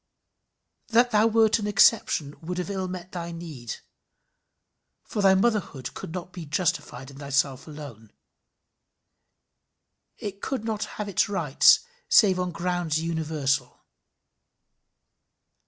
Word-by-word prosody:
That 240 +1 +3
thou 215 0 +4
wert 225 0 +3
an 210 - -3
exception 200 -8 +3
would 180 +2 -5
have 180 +2 -3
ill 190 -1 -2
met 180 0 -7
thy 170 -1 -5
need, 155 -9 -7 1.3
for 210 - -3
thy 195 -1 +6
motherhood 195 - 0
could - - -8
not 180 +1 -7
be 175 - -7
justified 145 -4 -2
in 140 - -13
thyself 140 -1 -1
alone. 140 -9 -10 2.1
It 200 -1 -7
could 260 -5 -3
not 220 -2 -2
have 210 - -3
its 200 0 +1
rights 165 -9 +5 0.3
save 190 -5 +5
on 180 0 -1
grounds 175 -2 -1
universal. 155 -5 -2
175 Hz, 120 wpm, -26 LUFS, 150-205 Hz, 2.1 s, thy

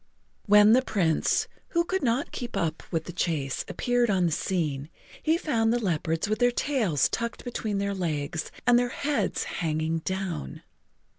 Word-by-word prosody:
When 210 +1 +7
the 255 - +6
Prince, 180 -10 +1 0.2
who 340 0 +1
could 380 +2 -1
not 255 +1 0
keep 240 -1 -5
up 160 -1 -1
with 165 -2 -1
the 175 - -8
chase, 155 -6 -1
appeared 245 -1 +1
on 185 -3 +2
the 170 - +1
scene, 150 -5 -1 0.3
he 320 +1 +2
found 225 -9 +1
the 240 - +2
leopards 165 -5 -1
with 215 +1 -1
their 245 0 +5
tails 240 - +1
tucked 235 0 -4
between 220 -4 -2
their 200 0 -1
legs 160 -4 -2 0.2
and 245 0 +6
their 245 0 0
heads 245 -8 -1
hanging 160 0 -1
down. 185 - -4
200 Hz, 165 wpm, -27 LUFS, 160-240 Hz, 0.3 s, When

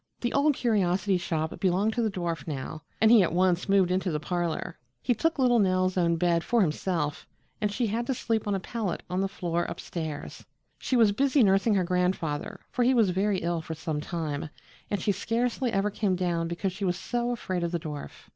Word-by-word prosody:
The 240 - -1
Old 285 +1 +3
Curiosity 195 -5 +1
Shop 160 -2 -2
belonged 195 +4 +2
to 240 - 0
the 225 - +1
dwarf 175 -4 -3
now 150 +1 -5 0.2
and 220 +1 +5
he 235 -3 +8
at 170 -3 +1
once 180 +1 +2
moved 195 -2 +4
into 185 +1 0
the 150 -3 -1
parlor. 175 +1 -3 0.2
He 245 - +1
took 325 +9 0
little 245 -3 +4
Nell's 185 -2 +2
own 170 -2 +2
bed 170 0 +1
for 235 -1 +2
himself 155 -3 -1 0.3
and 210 -1 +1
she 235 +4 0
had 230 +3 -2
to 265 - 0
sleep 225 -3 -1
on 205 - +1
a - - -1
pallet 210 -1 -3
on 185 +1 0
the 195 - +1
floor 175 -3 -2
up - - -6
stairs. 160 -4 -6 0.4
She 260 - -1
was 225 -3 +5
busy 270 +4 +3
nursing 195 +2 +3
her 190 - +2
grandfather, 180 -4 -1
for - - -1
he 255 +2 +4
was 220 -6 +4
very 195 +1 +1
ill 170 -1 0
for 160 0 -6
some 155 -1 -3
time, 155 -3 -3 0.4
and 205 - -1
she 205 - +1
scarcely 235 +5 -1
ever 200 0 +1
came 200 -2 0
down 175 -2 -1
because 175 +2 -2
she 200 +2 -6
was 175 -2 +1
so 240 0 -2
afraid 185 -7 -2
of 170 - -1
the 170 - -1
dwarf. 150 -2 -8
185 Hz, 215 wpm, -27 LUFS, 170-220 Hz, 0.4 s, he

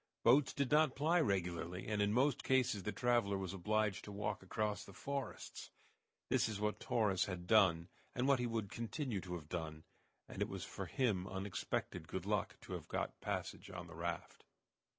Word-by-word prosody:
Boats 130 +4 +6
did 140 -1 -1
not 150 -2 +5
ply 165 +5 +3
regularly, 90 - -1
and 105 -1 +1
in 100 0 +3
most 130 +4 +3
cases 130 -6 +3
the 105 - -2
traveler 120 -5 +2
was 95 -1 -3
obliged 105 +1 +1
to 105 - -7
walk 105 0 -2
across 105 +2 -1
the 100 - -12
forests. 140 -4 -4 0.6
This - - +3
is 105 -2 -3
what 105 0 0
Torres 105 -5 +2
had 90 -3 -5
done, 90 -5 +5 0.3
and 125 +2 +1
what 140 -2 +5
he 125 - +1
would 110 -4 -2
continue 115 - -2
to 90 -1 -5
have 80 -4 -7
done, 80 -2 -4 0.4
and - - -7
it - - +1
was - - -4
for - - -5
him 105 -8 +1
unexpected 95 -1 -3
good - - -4
luck - - 0
to - - -7
have - - -5
got - - -1
a - - -25
passage - - -3
on 90 -2 -6
the 85 - -11
raft. 85 +1 -4
105 Hz, 190 wpm, -38 LUFS, 95-120 Hz, 0.6 s, Boats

